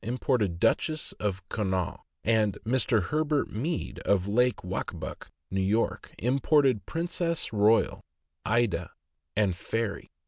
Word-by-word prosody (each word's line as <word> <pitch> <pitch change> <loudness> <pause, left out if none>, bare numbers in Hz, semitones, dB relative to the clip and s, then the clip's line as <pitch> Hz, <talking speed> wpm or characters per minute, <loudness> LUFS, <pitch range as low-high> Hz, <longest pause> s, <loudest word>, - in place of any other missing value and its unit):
imported 110 -6 0
Duchess 155 - +1
of 95 -3 -2
Connaught, 95 -4 -1 0.2
and 110 -3 +2
Mr. 120 -3 +2
Herbert 150 - 0
Mead, 150 +11 -3
of 100 -3 +2
LakeWaccabuc, 105 -3 -1 0.2
N. 95 +3 +2
Y., 115 - 0 0.2
imported 130 - +2
Princess 170 -3 -1
Royal, 105 +2 +3 0.4
Aydah, 100 -7 +1 0.5
and 100 -4 +2
Fairy. 115 +3 -3
110 Hz, 105 wpm, -28 LUFS, 100-130 Hz, 0.5 s, Royal